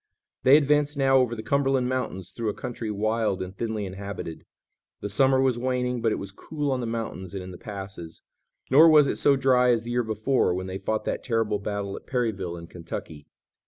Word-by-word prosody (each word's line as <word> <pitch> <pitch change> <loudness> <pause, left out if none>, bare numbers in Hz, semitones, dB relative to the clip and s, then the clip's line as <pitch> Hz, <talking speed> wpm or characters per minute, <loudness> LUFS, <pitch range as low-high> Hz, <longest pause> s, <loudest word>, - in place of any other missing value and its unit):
They 135 +3 +7
advanced 145 0 +2
now 135 -1 +4
over 125 -2 +2
the 110 - -6
Cumberland 135 0 +1
mountains 115 -8 -3
through 115 -2 -3
a 105 - -3
country 115 -2 -5
wild 110 -1 0
and 95 +1 -9
thinly 110 -1 -3
inhabited. 95 -3 -7 0.5
The 105 - -3
summer 130 +4 +4
was 130 -3 +2
waning, 125 -1 -1
but 115 - +2
it - - +1
was 100 -1 -4
cool 145 +7 -4
on 130 - 0
the 120 - -3
mountains 110 -5 -5
and 95 - -4
in 90 - -8
the 90 - -10
passes, 95 -5 -8 0.5
nor 155 +5 +8
was 150 -2 +7
it - - -1
so 140 - +4
dry 130 -2 +3
as 115 -2 +2
the 120 - -5
year 120 0 +1
before, 110 -2 +1
when 95 0 -3
they 95 +1 -5
fought 110 +3 -2
that - - -2
terrible 115 -4 0
battle 100 -1 -4
at - - -11
Perryville 105 -9 -2
in 85 - -9
Kentucky. 80 -3 -8
115 Hz, 210 wpm, -26 LUFS, 100-130 Hz, 0.5 s, nor